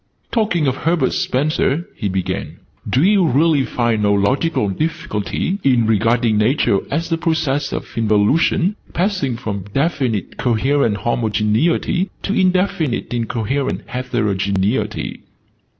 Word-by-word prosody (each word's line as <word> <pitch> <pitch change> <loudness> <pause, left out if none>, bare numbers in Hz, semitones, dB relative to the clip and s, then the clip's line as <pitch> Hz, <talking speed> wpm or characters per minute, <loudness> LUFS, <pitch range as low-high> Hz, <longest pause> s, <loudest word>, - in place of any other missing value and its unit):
"Talking 205 -9 +1
of 130 -1 0
Herbert 165 -4 +1
Spencer," 150 +3 0
he 105 - -2
began, 95 -1 -3 0.3
"do 130 - +2
you 200 0 +4
really 155 -1 +3
find 120 -3 0
no 105 -1 +2
logical 105 +6 +1
difficulty 160 - -2
in 125 -4 +3
regarding 115 +1 +2
Nature 110 -3 +2
as 165 +3 -2
a 165 - +1
process 160 -4 0
of - - -6
involution, 115 - +2 0.2
passing 175 - 0
from 100 -5 -5
definite 135 - -1
coherent 120 -1 +1
homogeneity 120 - 0
to 200 - -1
indefinite 185 - 0
incoherent 120 +3 -2
heterogeneity?" 105 -3 -1
130 Hz, 115 wpm, -19 LUFS, 110-165 Hz, 0.3 s, you